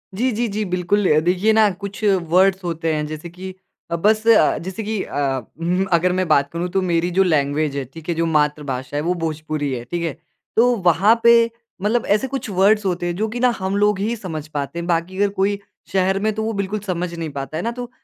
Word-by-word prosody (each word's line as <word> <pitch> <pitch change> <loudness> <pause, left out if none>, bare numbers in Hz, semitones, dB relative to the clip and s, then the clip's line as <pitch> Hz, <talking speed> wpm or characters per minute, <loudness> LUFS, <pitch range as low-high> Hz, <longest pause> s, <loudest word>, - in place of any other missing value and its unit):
जी, 250 +5 +1
जी, 235 +2 -1
जी, 215 +1 -1
बिल्कुल। 185 +2 +1
अ, 155 - +5
देखिए 185 +5 +3
ना 215 -1 +5
कुछ 200 +2 -6 0.3
वर्ड्स 190 +1 +4
होते 165 -2 -1
हैं 150 0 -1
जैसे 155 +2 -7
कि 185 +2 -8 0.4
अ, - - +1
बस 215 +5 +2
अ, 225 -9 +5
जैसे 190 +5 -5
कि 215 -1 -2
अ - - -7 0.4
उम, 180 +3 0
अगर 175 +2 +3
मैं 185 - 0
बात 140 -2 +3
करूँ 170 +2 -2
तो 190 - +3
मेरी 175 -1 0
जो 190 +2 +3
लैंग्वेज 150 -3 +1
है, 140 - -1
ठीक 160 +6 -12
है? 170 - 0
जो 165 +1 0
मातृभाषा 145 -4 -1
है - - 0
वो 175 +2 +1
भोजपुरी 155 -2 -2
है, 120 -1 -4
ठीक 170 +6 -3
है? 165 -4 -2 0.4
तो 245 +2 +4
वहाँ 200 +8 +4
पे 235 0 +8 0.5
मतलब 220 +3 +1
ऐसे 240 +5 -1
कुछ 265 -3 -4
वर्ड्स 200 +2 +3
होते 175 -1 -1
हैं 175 - -2
जो 215 +4 -1
कि 240 - -5
ना 250 0 +4
हम 190 +1 -2
लोग 205 -1 +2
ही 220 +4 -1
समझ 160 -8 -6
पाते 150 +2 -4
हैं, 170 - -4
बाकी 175 +2 -1
अगर 205 0 +2
कोई 200 +1 +1 0.3
शहर 190 +1 +2
में 220 - +3
तो 220 +1 -3
वो 225 - -2
बिल्कुल 200 +2 -2
समझ 180 -3 -3
नहीं 165 -2 -4
पाता 140 +2 -5
है - - -3
ना 235 - -1
तो 245 - -5
180 Hz, 235 wpm, -20 LUFS, 160-210 Hz, 0.5 s, पे